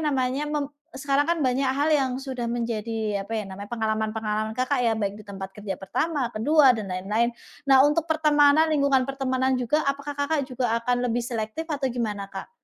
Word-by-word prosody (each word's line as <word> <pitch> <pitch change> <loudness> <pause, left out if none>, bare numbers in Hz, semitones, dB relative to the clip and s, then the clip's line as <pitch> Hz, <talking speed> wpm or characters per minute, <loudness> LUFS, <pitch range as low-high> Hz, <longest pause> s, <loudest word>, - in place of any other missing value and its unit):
namanya, 265 0 0
mem 295 -1 -1 0.3
sekarang 275 +1 +1
kan 335 +3 0
banyak 260 -1 +1
hal 280 +3 0
yang 270 -3 +1
sudah 260 -3 -4
menjadi 225 -3 -2
apa 200 - -15
ya 210 - -4
namanya, 200 +2 -9
pengalaman-pengalaman 220 -1 -1
Kakak 255 0 +1
ya, 230 -2 +3
baik 200 -2 -1
di 215 - -11
tempat 195 -1 -8
kerja 200 -3 -5
pertama, 285 - -1
ke-2 270 +4 +5
dan 210 -4 -5
lain-lain. 210 +6 0 0.4
Nah 270 +1 +7
untuk 320 +2 0
pertemanan, 300 -1 +4
lingkungan 280 -4 +2
pertemanan 265 -1 0
juga 255 +5 0
apakah 280 +1 -3
Kakak 285 +1 +1
juga 245 -2 0
akan 245 +1 +1
lebih 240 0 0
selektif 230 +4 -3
atau 285 -3 -1
gimana, 220 -5 -3
Kak? 195 -1 -8
250 Hz, 180 wpm, -25 LUFS, 220-280 Hz, 0.4 s, Nah